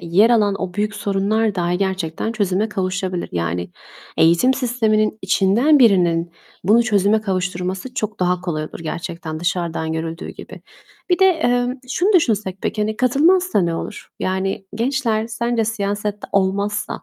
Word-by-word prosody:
yer 190 +8 +4
alan 210 -4 +3
o 180 -1 -4
büyük 210 +1 -1
sorunlar 210 +1 0
dahi 175 0 0
gerçekten 190 +1 -2
çözüme 205 0 0
kavuşabilir. 185 -2 -2
Yani, 85 +1 -2 0.5
eğitim 170 +11 +4
sisteminin 220 -4 +1
içinden 220 +11 +3
birinin 175 -7 +3 0.3
bunu 220 +5 +5
çözüme 210 -1 +2
kavuşturması 185 +3 -3
çok 215 -4 -3
daha 180 0 +1
kolay 160 -4 -3
olur 155 - -9
gerçekten, 165 0 -5
dışarıdan 170 -2 -2
görüldüğü 160 +1 -4
gibi. - - -10 0.5
Bir 355 - +3
de, 380 - +5
eee, 245 -9 +2 0.2
şunu 375 +10 +1
düşünsek 210 - +1
peki, 215 - -2
hani, 215 +1 -2
katılmazsa 310 - +3
ne 170 -1 0
olur? - - -6
Yani, 195 +1 -2
gençler 230 -2 0
sence 235 0 -1
siyasette 205 -1 -3
olmazsa 200 +2 -1
200 Hz, 140 wpm, -20 LUFS, 180-225 Hz, 0.5 s, bunu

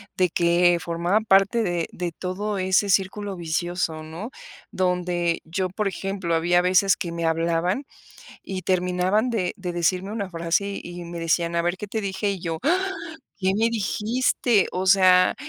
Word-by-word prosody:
de 185 -1 +2
que 175 +1 +3
formaba 170 +4 0
parte 200 +2 +3
de 175 -4 -1
de 175 -1 -4
todo 195 +4 -3
ese 190 +2 +2
círculo 195 +1 0
vicioso, 170 -1 -2
¿no? 165 +8 -7 0.4
Donde 180 -2 0
yo, 185 +3 -2
por 200 +3 -2
ejemplo, 190 -2 -3
había 175 +2 +3
veces 185 +2 +4
que 170 - -4
me 170 0 -3
hablaban, 170 - 0 0.6
y 190 -1 -5
terminaban 185 +5 +1
de 195 -7 -1
de 180 -2 -4
decirme 185 +3 0
una 200 -4 -3
frase, 175 +4 -1
y 175 0 -8
me 170 0 -7
decían: 170 +1 0
"A 170 - +2
ver, 175 +1 0
¿qué 210 - -6
te 220 +2 -3
dije?". 200 +1 -2
Y 195 - -5
yo: 165 -2 -4
"Ah, 370 +6 +1 0.5
¿qué 190 -1 +1
me 225 +1 +3
dijiste?. 230 +1 +1
O 185 +1 -2
sea, 185 -1 +5
185 Hz, 165 wpm, -24 LUFS, 170-200 Hz, 0.6 s, sea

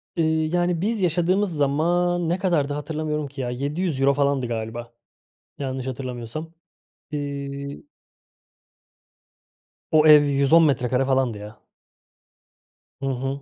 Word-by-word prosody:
Iıı, 160 -2 +1
yani, 175 -1 +1
biz 215 +2 -1
yaşadığımız 180 +2 +1
zaman 170 +4 +1
ne 175 - +1
kadardı, 165 -7 0
hatırlamıyorum 150 0 -3
ki 140 0 -7
ya. 125 - -2
€700 140 +1 0
falandı 140 -2 +1
galiba, 115 +1 -5 0.7
yanlış 130 -2 -4
hatırlamıyorsam. 130 +4 -6 0.6
İii 140 - -5 2.0
O 155 -1 +5
ev 150 -1 +9
110 140 +3 +4
metrekare 130 -3 +1
falandı, 130 -4 +1
ya. 105 +2 -10 1.4
Hı - - -3
hı. 135 +1 -3
140 Hz, 105 wpm, -23 LUFS, 130-165 Hz, 2.0 s, ev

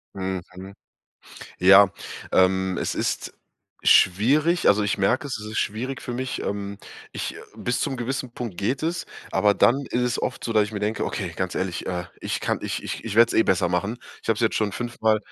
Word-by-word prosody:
Mhm. 95 0 -5 0.9
Ja, 95 +1 +7 0.4
ähm, 95 0 +3
es - - -1
ist - - -2 0.5
schwierig, 145 - +4
also, 105 +1 +4
ich 105 0 0
merke 105 +8 +1
es, 135 - -3
es 105 0 -7
ist - - -2
schwierig 125 +6 -2
für 120 - -5
mich. 130 +1 -3
Ähm, 100 0 -4 0.3
ich - - -4 0.2
bis 120 0 -1
zum 135 - -1
gewissen 130 0 -3
Punkt 120 -7 -6
geht 125 +10 -1
es, 165 +2 -1 0.3
aber 100 +2 +3
dann 120 - +4
ist 125 - 0
es 125 0 0
oft - - -3
so, 115 - -2
dass 110 -1 +4
ich 105 - -8
mir 105 - -4
denke: 105 +1 -1
„Okay, 90 -5 -3
ganz 95 -1 -2
ehrlich, 95 -2 -3
äh, 90 -1 -2 0.2
ich - - -3
kann - - -1
ich - - -3
ich - - -5
ich 110 -3 -4
werde 115 0 +7
es - - -3
eh - - +7
besser 90 -4 +2
machen. 100 +7 -1 0.2
Ich - - -11
habe 110 - +4
es - - -6
jetzt 115 -2 +2
schon 105 -2 0
5-mal 110 -2 0
105 Hz, 210 wpm, -24 LUFS, 95-120 Hz, 0.9 s, Ja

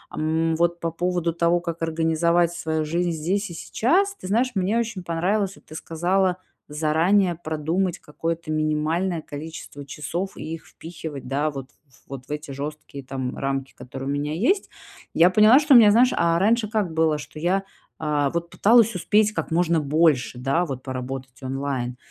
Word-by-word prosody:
М, 160 +1 0
вот 170 +1 +1
по 165 - -1
поводу 175 0 -1
того, 170 +1 +2
как 170 -1 -5
организовать 165 +1 +1
свою 160 -2 -2
жизнь 170 +3 0
здесь 180 +6 -1
и - - -8
сейчас. 360 - +1
Ты 185 - -9
знаешь, 235 +6 +1
мне 195 +4 +1
очень 220 -5 -3
понравилось, 190 +4 0
вот - - -21
ты 155 - -12
сказала, 180 +3 0 0.3
заранее 165 +5 +2
продумать 165 +3 -2
какое-то 165 +1 -4
минимальное 155 +3 0
количество 145 -1 -8
часов 175 +7 -4
и - - -7
их 165 - -9
впихивать, 160 -5 -8
да, 145 +4 0
вот, 135 -3 -7 0.4
вот 135 -1 -8
в - - -10
эти 150 -1 -5
жёсткие, 145 0 -7
там, 130 -1 -4
рамки, 135 0 -3
которые 135 +2 -8
у - - -1
меня 145 +1 -2
есть. 340 - +1 0.5
Я 175 +2 +6
поняла, 215 +5 +7
что 300 -1 +4
у - - +11
меня, 220 -3 +8
знаешь, 245 +4 +5
а 170 0 +2
раньше 220 +4 +2
как 210 -7 -1
было? 160 -1 +2
Что 150 +1 -9
я, 185 +4 +1 0.3
а 150 -2 0
вот, 170 +3 -4
пыталась 230 0 +4
успеть 210 +4 +2
как - - -3
можно 170 0 +2
больше, 145 -5 +2
да, 135 +7 +1
вот, 130 -5 -6
поработать 130 0 -6
онлайн. 130 -2 -3
165 Hz, 175 wpm, -23 LUFS, 150-185 Hz, 0.5 s, у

